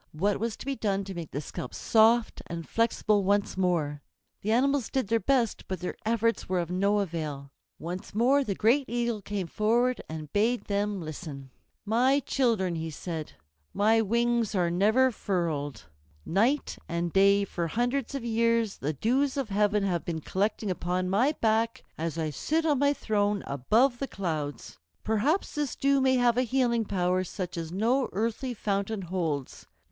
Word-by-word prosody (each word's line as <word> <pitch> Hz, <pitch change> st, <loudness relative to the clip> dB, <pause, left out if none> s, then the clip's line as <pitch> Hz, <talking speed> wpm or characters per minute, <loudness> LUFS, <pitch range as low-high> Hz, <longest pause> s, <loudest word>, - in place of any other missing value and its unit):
What 195 Hz, +6 st, 0 dB
was 225 Hz, 0 st, -2 dB
to -, -, -9 dB
be 275 Hz, 0 st, -1 dB
done 200 Hz, -4 st, -1 dB
to 195 Hz, 0 st, -7 dB
make 170 Hz, -4 st, -6 dB
the 145 Hz, -, -4 dB
scalp 125 Hz, -3 st, -7 dB
soft 225 Hz, +1 st, +3 dB
and 170 Hz, -1 st, -6 dB
flexible 215 Hz, -3 st, +1 dB
once 200 Hz, +1 st, +1 dB
more? 165 Hz, -6 st, 0 dB, 0.4 s
The 215 Hz, -, -1 dB
animals 270 Hz, +1 st, +2 dB
did 260 Hz, -7 st, -1 dB
their 230 Hz, 0 st, +3 dB
best, 245 Hz, -4 st, 0 dB
but 185 Hz, -, -3 dB
their 180 Hz, -, -4 dB
efforts 230 Hz, -2 st, +1 dB
were 185 Hz, -, +1 dB
of 170 Hz, 0 st, -3 dB
no 200 Hz, +3 st, +2 dB
avail. 155 Hz, -6 st, -4 dB, 0.3 s
Once 180 Hz, +4 st, -7 dB
more 265 Hz, +6 st, +4 dB
the 200 Hz, -6 st, -2 dB
great 250 Hz, +8 st, +3 dB
Eagle 235 Hz, -2 st, -1 dB
came 200 Hz, -1 st, -3 dB
forward 235 Hz, +8 st, +1 dB
and 155 Hz, -2 st, -7 dB
bade 230 Hz, +4 st, +2 dB
them 205 Hz, 0 st, -1 dB
listen. 150 Hz, -4 st, -7 dB, 0.3 s
"My 250 Hz, +6 st, +3 dB
children," 230 Hz, -10 st, +1 dB
he 160 Hz, 0 st, -3 dB
said, 160 Hz, 0 st, -6 dB, 0.4 s
"my 220 Hz, +3 st, +4 dB
wings 235 Hz, 0 st, +1 dB
are 175 Hz, -2 st, +2 dB
never 220 Hz, +9 st, +3 dB
furled. 160 Hz, -, -2 dB, 0.4 s
Night 235 Hz, -, +1 dB
and 170 Hz, 0 st, -2 dB
day 200 Hz, +1 st, +5 dB
for 170 Hz, -3 st, -3 dB
hundreds 245 Hz, -, -1 dB
of 260 Hz, -4 st, -4 dB
years 230 Hz, -2 st, +1 dB
the 150 Hz, +3 st, -2 dB
dews 260 Hz, -, +1 dB
of 270 Hz, -5 st, -2 dB
heaven 205 Hz, 0 st, +2 dB
have 180 Hz, -4 st, 0 dB
been 165 Hz, -2 st, -4 dB
collecting 200 Hz, +3 st, -1 dB
upon 180 Hz, +1 st, -1 dB
my 250 Hz, +10 st, +3 dB
back 225 Hz, +1 st, +1 dB
as 165 Hz, 0 st, -3 dB
I 160 Hz, -2 st, -1 dB
sit 315 Hz, -, -1 dB
on 295 Hz, -4 st, +2 dB
my 285 Hz, 0 st, +4 dB
throne 205 Hz, -6 st, 0 dB
above 225 Hz, -, +2 dB
the 275 Hz, -, -2 dB
clouds. 155 Hz, -, -4 dB, 0.2 s
Perhaps 240 Hz, -, +1 dB
this 295 Hz, -3 st, -2 dB
dew 275 Hz, 0 st, +2 dB
may 260 Hz, 0 st, +4 dB
have 245 Hz, -1 st, +3 dB
a -, -, +4 dB
healing 245 Hz, -2 st, +1 dB
power 185 Hz, -1 st, 0 dB
such 185 Hz, 0 st, -5 dB
as 165 Hz, -1 st, -5 dB
no 235 Hz, +8 st, +1 dB
earthly 230 Hz, +5 st, -2 dB
fountain 200 Hz, 0 st, -2 dB
holds. 165 Hz, -7 st, -3 dB
205 Hz, 170 wpm, -28 LUFS, 175-235 Hz, 0.4 s, day